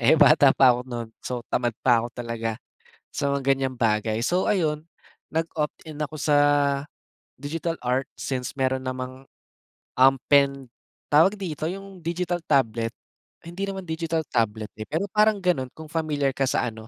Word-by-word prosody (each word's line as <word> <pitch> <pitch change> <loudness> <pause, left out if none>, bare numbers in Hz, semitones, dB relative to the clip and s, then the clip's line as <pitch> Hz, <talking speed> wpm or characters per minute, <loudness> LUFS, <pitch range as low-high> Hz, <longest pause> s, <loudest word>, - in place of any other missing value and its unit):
eh, 135 +7 +5
bata 145 -2 +7
pa 130 -2 +7
'ko 120 - -2
no'n 115 -2 -5
so 120 -2 -5
tamad 120 -3 0
pa 120 -3 +5
'ko 120 - -4
talaga 115 -2 -3 0.5
sa 140 - -2
mga 140 - -2
gan'yang 135 -1 +1
bagay. 110 -1 0
So, 180 +8 +1
ayun 155 -5 0 0.5
nag-opt 160 -2 -2
in 150 - -9
ako 150 0 -3
sa 150 -1 +2 1.0
digital 165 +4 -3
art 125 +2 0
since 125 -2 -3
meron 130 0 0
namang, 130 +1 -6 0.7
um, 135 +1 +7 0.2
pen 140 -2 +4 0.4
tawag 165 +8 +5
dito 160 -6 -4
yung 195 +1 -7
digital 175 +1 -2
tablet, 115 -6 +1 0.5
hindi 180 +4 -5
naman 195 -1 -5
digital 160 -1 -2
tablet, 110 -2 -1
eh, 110 - -5
pero 185 +6 -2
parang 210 -2 +3
gano'n 140 -8 +1
kung 160 -1 -11
familiar 150 -4 0
ka 135 0 -1
sa 125 - +1
ano, 110 0 -12
140 Hz, 160 wpm, -25 LUFS, 125-165 Hz, 1.0 s, bata